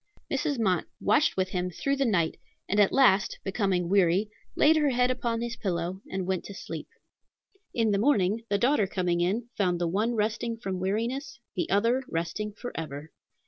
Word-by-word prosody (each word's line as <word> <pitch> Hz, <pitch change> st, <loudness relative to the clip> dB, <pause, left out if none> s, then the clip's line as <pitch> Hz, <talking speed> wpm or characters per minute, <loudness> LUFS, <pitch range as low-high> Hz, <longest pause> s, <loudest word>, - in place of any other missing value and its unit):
Mrs. 280 Hz, +1 st, 0 dB
Mott 190 Hz, -7 st, +1 dB
watched 245 Hz, +6 st, +2 dB
with 185 Hz, 0 st, +1 dB
him 180 Hz, -1 st, -2 dB
through 275 Hz, +10 st, -1 dB
the 275 Hz, -, +2 dB
night, 170 Hz, -7 st, +1 dB, 0.3 s
and 205 Hz, -, +1 dB
at 205 Hz, -, +5 dB
last, 225 Hz, -8 st, +4 dB
becoming 195 Hz, -3 st, 0 dB
weary, 195 Hz, +2 st, +3 dB, 0.2 s
laid 315 Hz, +2 st, +5 dB
her 300 Hz, -2 st, +3 dB
head 250 Hz, 0 st, +2 dB
upon 235 Hz, -2 st, -2 dB
his 235 Hz, 0 st, -3 dB
pillow 180 Hz, -2 st, -3 dB
and 190 Hz, -1 st, -3 dB
went 185 Hz, -1 st, -1 dB
to 200 Hz, -, -8 dB
sleep. -, -, -7 dB, 0.9 s
In 225 Hz, -2 st, +2 dB
the 200 Hz, -, +2 dB
morning, 220 Hz, -3 st, +2 dB
the 200 Hz, -, +2 dB
daughter 240 Hz, -2 st, +2 dB
coming 180 Hz, -2 st, 0 dB
in, 215 Hz, +7 st, 0 dB
found 180 Hz, -4 st, +1 dB
the 175 Hz, -, 0 dB
one 215 Hz, +7 st, 0 dB
resting 230 Hz, +2 st, -1 dB
from 190 Hz, -5 st, -4 dB
weariness, 235 Hz, +8 st, -2 dB, 0.2 s
the 180 Hz, -, -1 dB
other 230 Hz, +7 st, +2 dB
resting 170 Hz, +6 st, -2 dB
forever. 160 Hz, -, -7 dB
205 Hz, 180 wpm, -28 LUFS, 185-235 Hz, 0.9 s, at